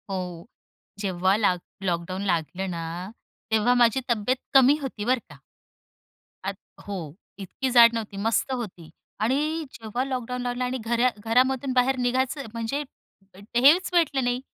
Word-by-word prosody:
हो, 180 -3 -5 0.5
जेव्हा 190 -1 +1
लाक 180 -4 +3 0.3
लॉकडाउन 175 +2 -3
लागलं 175 +3 -2
ना 165 0 -4 0.7
तेव्हा 220 +3 +3
माझी 235 +2 +3
तब्येत 235 +2 +1 0.2
कमी 270 +2 +6
होती 235 -6 -5
बरं 255 +1 +2
का. - - -14 1.1
आत - - -3 0.3
हो, 170 -7 -5 0.2
इतकी 200 +7 -3
जाड 235 -1 +8
नव्हती, 215 -3 -4
मस्त 225 +5 0
होती 190 -10 -6 0.3
आणि 300 +7 0
जेव्हा 225 +3 -3
लॉकडाउन 250 -2 -3
लागला 245 0 -2
आणि 255 +1 -2
घरा 235 +2 +3 0.2
घरामधून 260 +3 +2
बाहेर 255 +1 +3
निघायचं 260 +3 0
म्हणजे 230 +6 -2 0.7
हेच 290 +10 +5
भेटलं 300 -6 +2
नाही. 245 +1 0
240 Hz, 135 wpm, -25 LUFS, 200-260 Hz, 1.1 s, जाड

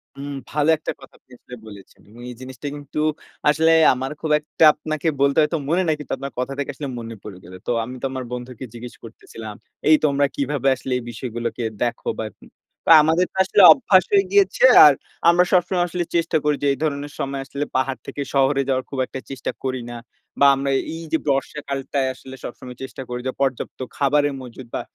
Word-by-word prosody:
হুম। 140 +1 -7 0.2
ভালো 150 +1 +1
একটা 155 - -4
কথা 135 - -15
আপনি - - -34
আসলে 125 - -11
বলেছেন। 100 -2 -14
এবং 115 +3 -14
এই 125 - -8
জিনিসটা 130 +2 -8
কিন্তু 145 +1 -6 0.5
আসলে 160 +2 +3 0.2
আমার 130 +2 -4
খুব 160 - -2
একটা 150 +2 -2
আপনাকে 155 +1 -4
বলতে 140 0 +3
হয়তো 155 +2 +1
মনে 175 +3 +2
নাই, 155 - +2
কিন্তু 150 - -5
আপনার 140 0 -6
কথা 125 +2 -2
থেকে 140 - -3
আসলে 145 - -5
মনে 115 0 -7
পড়ে 100 -4 -9
গেলো। 90 +2 -11
তো - - +1
আমি 125 +3 -7
তো - - -2
আমার 130 -1 -4
বন্ধুকে 125 0 -7
জিজ্ঞেস 120 +1 -9
করতেছিলাম, 110 -1 -10 0.3
"এই 155 - +8
তোমরা 140 -1 +2
কিভাবে 140 -1 -1
আসলে 130 - -7
এই 125 - -6
বিষয়গুলোকে 120 +1 -5 0.2
দেখো 120 -1 -3
বা - - -3
এরকম।" 105 - -16 0.4
"তো - - -2
আমাদের 160 +4 +2
তো - - -11
আসলে 190 +2 +3
অভ্যাস 195 -10 +3
হয়ে 200 -1 +5
গিয়েছে, 200 +1 +3 0.2
আর 150 - +8 0.4
আমরা 175 +1 +5
সবসময় 180 0 +2
আসলে 175 +1 -2
চেষ্টা 170 -1 +2
করি 150 0 +2
যে, - - +2
এই - - -6
ধরনের 145 -1 -2
সময় 135 0 -3
আসলে 140 +1 -4
পাহাড় 130 0 0
থেকে 145 - -5
শহরে 140 0 +3
যাওয়ার, 130 -1 0
খুব 135 - -5
একটা 130 - -7
চেষ্টা 135 -3 -4
করি 130 -1 -2
না। 120 - -7 0.4
বা 140 - +7
আমরা 135 0 -2 0.2
এইযে 165 -1 -2
বর্ষাকালটায় 140 -1 -1
আসলে 130 +1 -12
সবসময় 125 0 -9
চেষ্টা 130 0 -8
করি 125 0 -4
যে, - - 0
পর্যাপ্ত 135 -3 -2 0.2
খাবারের 145 +1 +2
মজুত 125 0 -10
বা - - -2
140 Hz, 200 wpm, -21 LUFS, 125-150 Hz, 0.5 s, এই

